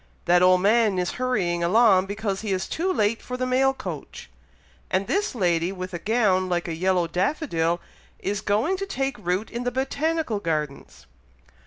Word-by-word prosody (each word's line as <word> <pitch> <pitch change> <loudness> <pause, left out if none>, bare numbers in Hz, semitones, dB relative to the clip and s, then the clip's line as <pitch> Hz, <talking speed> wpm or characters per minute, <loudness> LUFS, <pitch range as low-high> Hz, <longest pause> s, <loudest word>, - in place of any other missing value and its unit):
that 175 0 +4
old 185 0 +5
man 215 -1 +3
is 180 -1 0
hurrying 180 -9 0
along 195 0 +4
because 200 -1 -3
he 215 -2 -3
is 185 -1 -1
too 365 +4 -1
late 215 - +1
for 250 - -5
the 255 - -1
mail 260 +1 +3
coach; 270 - -8 0.6
and 185 +1 0
this 405 - -1
lady 175 -4 +1
with 185 -1 -6
a 175 - -3
gown 195 -3 +1
like 175 -1 -1
a 165 - -3
yellow 180 +1 +1
daffodil, 175 - 0 0.4
is 200 +1 -3
going 220 - +1
to 390 +1 -4
take 270 -7 -2
root 180 +5 -1
in 240 +1 -4
the 245 - 0
Botanical 275 0 -1
Gardens!" 155 -6 -4
200 Hz, 175 wpm, -24 LUFS, 180-250 Hz, 0.6 s, old